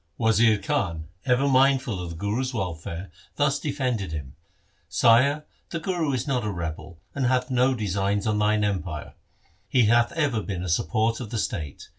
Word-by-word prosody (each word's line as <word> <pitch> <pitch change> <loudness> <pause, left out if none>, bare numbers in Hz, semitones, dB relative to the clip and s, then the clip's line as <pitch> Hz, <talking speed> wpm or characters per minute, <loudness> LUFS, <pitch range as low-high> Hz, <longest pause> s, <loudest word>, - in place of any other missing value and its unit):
Wazir 115 -1 +4
Khan, 85 -6 -2 0.2
ever 125 +2 +3
mindful 130 -6 +3
of 90 - -5
the 85 - -7
Guru's 115 +8 -2
welfare, 85 -2 -4 0.2
thus 145 -1 +2
defended 125 - -2
him, 70 -4 -6 0.3
' - - -40
Sire, 140 +6 +5 0.2
the 170 - -3
Guru 165 -3 -1
is 130 - -1
not 130 -4 0
a 105 - -1
rebel, 85 -3 -5 0.2
and 135 -3 0
hath 125 0 +1
no 130 +1 +3
design 100 -2 -1
on 105 -1 +1
thine 105 0 +2
empire. 90 -7 -3 0.6
He 125 +1 +4
hath 120 +2 +4
ever 145 -9 0
been 95 -4 -4
the 90 - -3
support 110 +8 +1
of 120 -4 -6
the 115 - -3
state. 75 -8 -4
110 Hz, 175 wpm, -25 LUFS, 95-130 Hz, 0.6 s, Sire